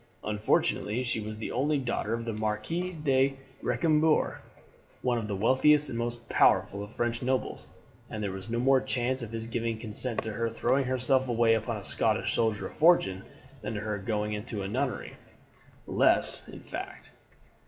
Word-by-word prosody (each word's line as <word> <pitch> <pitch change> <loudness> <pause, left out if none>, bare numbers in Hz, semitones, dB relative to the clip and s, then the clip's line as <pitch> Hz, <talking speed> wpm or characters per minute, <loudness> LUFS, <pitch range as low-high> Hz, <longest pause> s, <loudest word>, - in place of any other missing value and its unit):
Unfortunately 105 +2 0
she 120 -2 -1
was 110 0 -6
the 110 - -5
only 145 +4 +1
daughter 120 -4 -2
of 115 0 -5
the 115 - -3
Marquis 110 +13 -2
de 135 -1 +2 0.2
Recambours, 155 +5 +2 0.6
one 125 -2 +1
of 110 - -5
the 100 - -2
wealthiest 130 +8 +4
and 115 - -4
most 120 0 -4
powerful 100 - +3
of 105 +1 -8
French 120 0 -2
nobles, 130 +1 -2 0.4
and 105 - -5
there 100 - -2
was 95 +2 -7
no 115 - -1
more 130 +2 +4
chance 130 +1 0
of 115 - -6
his 115 0 -4
giving 115 0 -2
his 110 - -12
consent 115 +2 -1
to 110 -1 -4
her 115 +2 -1
throwing 125 +4 +1
herself 130 +1 +1
away 115 -1 +3
upon 110 +1 -1
a 100 - -8
Scottish - - 0
soldier 110 -3 +1
of - - -7
fortune 150 - +4 0.4
than 105 +1 -4
to 105 - -3
her 105 -1 -3
going 105 +1 -2
into 105 -1 -4
a - - -3
nunnery; 130 +5 -3 0.7
less, - - +4
in - - -10
fact. - - -8
115 Hz, 180 wpm, -28 LUFS, 105-130 Hz, 0.7 s, wealthiest